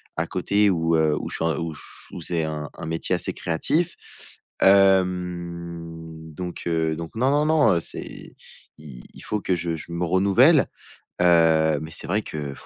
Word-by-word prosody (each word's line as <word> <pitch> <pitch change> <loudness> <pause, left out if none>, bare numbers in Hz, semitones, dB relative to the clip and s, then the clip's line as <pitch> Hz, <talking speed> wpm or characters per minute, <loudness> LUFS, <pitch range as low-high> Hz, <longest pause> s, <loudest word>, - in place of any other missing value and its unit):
à - - -1
côté 105 0 +1
où, 80 -2 +1
heu, 80 -1 +3
où - - -5
je - - -4
suis - - -3
un 80 - 0
où 85 -1 -4
ch 70 - -12
où 85 - -7
c'est 80 -1 -1
un 75 -1 -5
un - - -7
métier 80 +1 -2
assez - - -1
créatif. 155 - 0 0.7
Hem 85 -4 +1
donc, 90 +1 -6
heu, 80 -1 0
donc, 85 +4 -8
non, 130 +4 +2
non, 145 +1 +2
non, 150 - +4
heu, 85 - +2
c'est, - - -7 0.7
i 70 -6 -11
il - - -13
faut 105 -1 -3
que 95 - 0
je 85 -1 -2
je 80 +2 -9
me 85 +1 -2
renouvelle, 100 - +4 0.5
heu, 80 -3 +4
mais 80 - -8
c'est - - -7
vrai 105 +5 +1
que, 75 -6 -6
85 Hz, 185 wpm, -23 LUFS, 80-95 Hz, 0.7 s, non